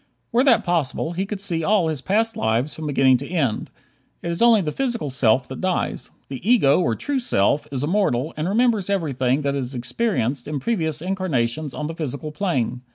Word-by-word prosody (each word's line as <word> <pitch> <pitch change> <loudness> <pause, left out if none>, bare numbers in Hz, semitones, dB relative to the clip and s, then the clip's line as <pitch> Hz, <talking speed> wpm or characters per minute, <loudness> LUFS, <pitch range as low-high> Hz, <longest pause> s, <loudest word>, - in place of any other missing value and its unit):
Were 245 +2 +3
that 235 -5 +5
possible, 165 -2 -1
he 190 +3 -2
could 205 -1 -4
see 170 -5 -2
all 195 -1 +3
his 155 -4 -3
past 220 +7 +1
lives 115 +6 0
from 155 -1 -5
beginning 135 -3 +4
to - - -8
end. 145 -11 -1 0.5
It 170 - -2
is 170 - -3
only 235 -3 +6
the 155 -4 -2
physical 235 - -2
self 125 -1 +2
that 130 - -7
dies; 185 -1 -1 0.2
the 135 -2 -7
ego, 190 - +4
or 140 -11 +1
true 285 - -2
self, 145 - +1
is 135 -1 -2
immortal 155 -5 0
and 155 +4 -2
remembers 220 -2 +2
everything 140 -7 0
that 140 0 0
it - - -1
has 130 0 -4
experienced 130 - -1
in 150 -1 -3
previous 160 - -1
incarnations 155 -7 -1
on 150 - -3
the 160 - -4
physical 150 -1 -5
plane. 135 - -1
155 Hz, 200 wpm, -22 LUFS, 130-195 Hz, 0.5 s, only